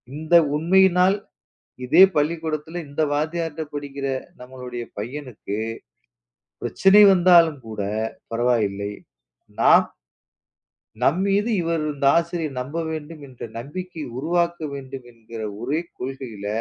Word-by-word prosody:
இந்த 160 +3 +1 0.2
உண்மையினால், 185 +3 +4 0.7
இதே 180 - +7
பள்ளிக்கூடத்துல 155 +1 -2
இந்த 145 +3 -2
வாத்தியாரிட்ட 160 +1 -2
படிக்கிற 140 -1 -5 0.3
நம்மளுடைய 125 -1 -7 0.2
பையனுக்கு, 120 -4 -6 1.1
பிரச்சனை 195 - +5
வந்தாலும் 170 -4 +5
கூடப் 110 +1 -3 0.2
பரவாயில்லை. 105 -4 0 0.7
ந - - +2 1.4
நாம் 155 +8 +3
மீது 205 +3 +1
இவர், 165 -1 -1
இந்த 140 -1 -2
ஆசிரியர் 165 -5 -1
நம்ப 145 +6 -6
வேண்டும் 155 -1 -7
என்ற 125 -2 -14 0.2
நம்பிக்கை 170 +6 -7
உருவாக்க 170 +4 0 0.2
வேண்டும் 135 -2 -8
என்கிற 115 -1 -9 0.2
ஒரே 140 +6 -1 0.2
கொள்கையில 125 -6 -6
150 Hz, 100 wpm, -23 LUFS, 125-170 Hz, 1.4 s, இதே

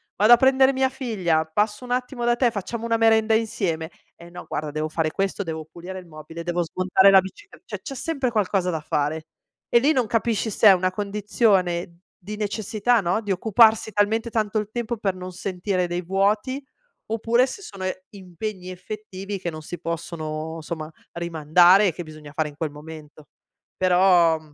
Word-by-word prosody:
vado 215 +4 +6
a - - +8
prendere 265 +1 +4
mia 265 0 +1
figlia, 200 - -1
passo 210 +8 -1
un 245 - -8
attimo 250 0 -2
da 240 0 +3
te, 240 -1 +2
facciamo 220 +3 -5
una 230 0 +1
merenda 225 -1 +4
insieme?" 175 -7 -1 0.3
"Eh 170 0 -14
no, 175 +1 -10
guarda, 150 0 -3
devo 155 +1 -3
fare 155 0 -1
questo, 195 +2 -2
devo 160 -2 -5
pulire 180 +3 -8
il 180 - -13
mobile, 160 +1 -9
devo 175 0 -1
smontare 185 +3 +3
la 195 - +8
bicicle" 395 - -12 0.2
c'è 275 -3 -7
sempre 275 -3 -2
qualcosa 195 -4 0
da 160 - -2
fare. 155 +1 -2 0.4
E 235 - +5
lì 285 +5 +3
non 255 -4 +1
capisci 225 -1 0
se 215 - +4
è - - +10
una 185 0 +1
condizione 195 -4 0 0.2
di 210 +3 -8
necessità, 215 +2 0
no, 180 +5 0
di 205 -2 -4
occuparsi 220 +3 +4
talmente 220 +3 +1
tanto 215 -1 0
il 210 0 -5
tempo 235 0 -3
per 195 -3 -1
non 185 0 -7
sentire 180 0 -2
dei 175 +1 -3
vuoti 210 +9 0 0.4
oppure 230 +3 +2
se 270 - -8
sono 195 - -9 0.3
impegni 185 0 -7
effettivi 195 +1 -7
che 175 - -3
non 155 - -8
si 175 +3 -7
possono 160 -1 -5
somma 155 -1 -6 0.2
rimandare 170 +4 +4
e 170 - 0
che 175 - -7
bisogna 155 -2 -12
fare 155 -1 -1
in 145 - -15
quel 155 -2 -3
momento. 150 0 -12 0.5
Però 180 -3 +4
190 Hz, 180 wpm, -23 LUFS, 170-220 Hz, 0.5 s, è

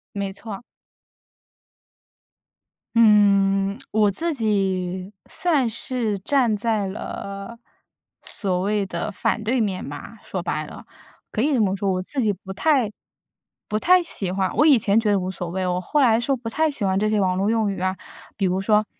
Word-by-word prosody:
没 200 -1 -2
错。 200 +2 -8 2.4
嗯， 200 -2 +4
我 210 -1 +3
自 325 - -1
己 190 -5 -1 0.2
算 300 -9 +1
是 225 -2 -2
站 240 +1 +2
在 210 -1 0
了， 200 +3 -7 0.6
所 185 -4 -2
谓 205 +1 0
的 185 +3 -4
反 215 +2 -1
对 245 +4 +1
面 200 -5 -1
吧， - - -9
说 - - -4
白 - - -2
了。 - - -11 0.4
可 215 - -2
以 290 +4 +2
这 255 - +2
么 195 -2 +1
说， 195 0 -1
我 185 0 -1
自 265 +8 -3
己 215 -3 +2
不 190 0 -8
太 260 0 +2 0.8
不 210 - -1
太 360 +10 +5
喜 195 - -2
欢 190 0 0
我 300 - +4
以 285 -6 +6
前 200 0 +2
觉 220 -2 +3
得 200 - +3
无 185 - -3
所 180 -2 -5
谓， 185 +1 -2
我 180 0 0
后 295 +11 0
来 235 -5 +5
说 260 +3 0
不 235 -2 -6
太 315 +6 +1
喜 265 -8 -3
欢 190 0 +1
这 215 +2 +1
些 215 -1 +1
网 185 -2 +1
络 195 +2 +1
用 220 -2 +1
语 190 -2 -4
啊， 185 0 -1 0.4
比 195 - +1
如 185 +1 0
说， 210 +1 +3
205 Hz, 195 characters per minute, -23 LUFS, 190-230 Hz, 2.4 s, 以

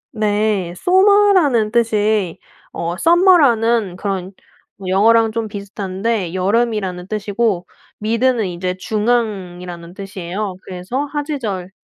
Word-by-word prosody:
네. 210 -3 0
sommar라는 370 - +4
뜻이 215 -5 +1 0.3
어 170 +1 -3
서머라는 240 - +4
그런 190 -1 -4 0.6
영어랑 225 +4 +4
좀 225 -1 -3
비슷한데 200 -1 -3
여름이라는 195 -2 0
뜻이고 205 -3 -1 0.4
mid는 230 0 +1
이제 180 +1 -3
중앙이라는 185 -6 -2
뜻이에요. 195 0 -5
그래서 190 +10 -4
하지절이 270 - -4
210 Hz, 285 characters per minute, -18 LUFS, 185-235 Hz, 0.6 s, sommar라는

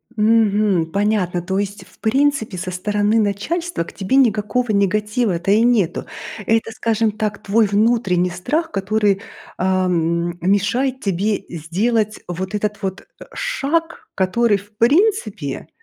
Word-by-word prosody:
Мгм. 210 -4 +3
Понятно, 200 -3 0
то 190 +3 -2
есть, 200 -1 -4
в 185 - -23
принципе, 265 -3 +1
со 185 +1 -4
стороны 205 +4 +1
начальства 220 - -1
к - - -12
тебе 195 +5 -1
никакого 240 -1 +2
негатива-то 205 -1 +1
и 210 +2 +5
нету. 230 -8 +1 0.4
Это, 225 +1 +1
скажем 225 0 0
так, 210 -1 -3
твой 220 +2 +3
внутренний 200 -4 +2
страх, 305 - -2
который, 200 0 +1 0.4
а, 185 0 +1
м, 170 0 0
мешает 220 +8 +1
тебе 195 +1 -1
сделать 210 +7 -1
вот 185 +3 -4
этот 210 0 -2
вот, 190 0 -3 0.2
э, - - -10
шаг, 425 - -2
который 205 +3 +2
в 205 +2 -16
принципе 390 - +1
210 Hz, 135 wpm, -20 LUFS, 190-230 Hz, 0.4 s, и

